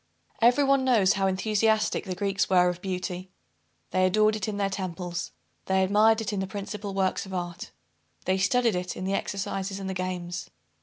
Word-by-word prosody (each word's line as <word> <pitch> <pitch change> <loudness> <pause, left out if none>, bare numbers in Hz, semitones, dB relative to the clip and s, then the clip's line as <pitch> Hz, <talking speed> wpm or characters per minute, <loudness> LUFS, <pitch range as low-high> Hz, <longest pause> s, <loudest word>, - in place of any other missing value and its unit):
Every 245 +5 +5
one 275 -1 +3
knows 225 -7 +4
how 195 0 +1
enthusiastic 215 +3 +1
the 185 -2 -4
Greeks 200 +1 0
were 180 -1 +5
of 180 0 -5
beauty. 185 -1 -4 0.6
They 185 0 +3
adored 215 +3 +3
it 215 -2 -3
in 210 -1 -3
the 200 -1 +1
temples. 180 -2 -4 0.4
They 190 0 +3
admired 215 +3 +4
it 215 -1 -3
in 200 - -1
the 190 - -2
principal 200 0 -5
works 190 0 0
of 190 - -6
art. 175 -1 -5 0.6
They 190 +1 +1
studied 230 +4 +3
it 180 0 -3
in - - -5
the 195 - -1
exercises 195 0 -3
and 195 - -5
the 190 - -2
games. 180 -1 -4
190 Hz, 190 wpm, -27 LUFS, 185-210 Hz, 0.6 s, Every